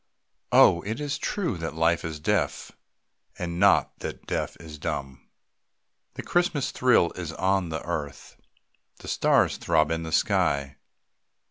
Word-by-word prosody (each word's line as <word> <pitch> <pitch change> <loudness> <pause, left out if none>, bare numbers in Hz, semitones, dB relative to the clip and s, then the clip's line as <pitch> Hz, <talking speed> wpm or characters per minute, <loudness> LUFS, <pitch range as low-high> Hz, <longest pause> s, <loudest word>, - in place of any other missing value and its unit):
Oh, 85 - +6
it 110 +6 -4
is 145 -1 -3
true 170 - -2
that 80 -1 -5
life 80 +1 +2
is 80 -2 -5
deaf, 75 - -1 0.7
And 85 -1 -4
not 100 0 +3
that - - -7
death - - -3
is 80 -3 -10
dumb. 70 -3 -4 0.9
The - - -6
Christmas 175 -6 0
thrill 125 -9 +3
is 85 -3 -6
on 95 -1 0
the 80 0 -4
earth, 75 -5 -5 0.6
The - - -12
stars - - +2
throb 80 -2 +1
in 80 0 -1
the 80 -1 -6
sky. 70 -2 +1
85 Hz, 140 wpm, -26 LUFS, 80-100 Hz, 0.9 s, Oh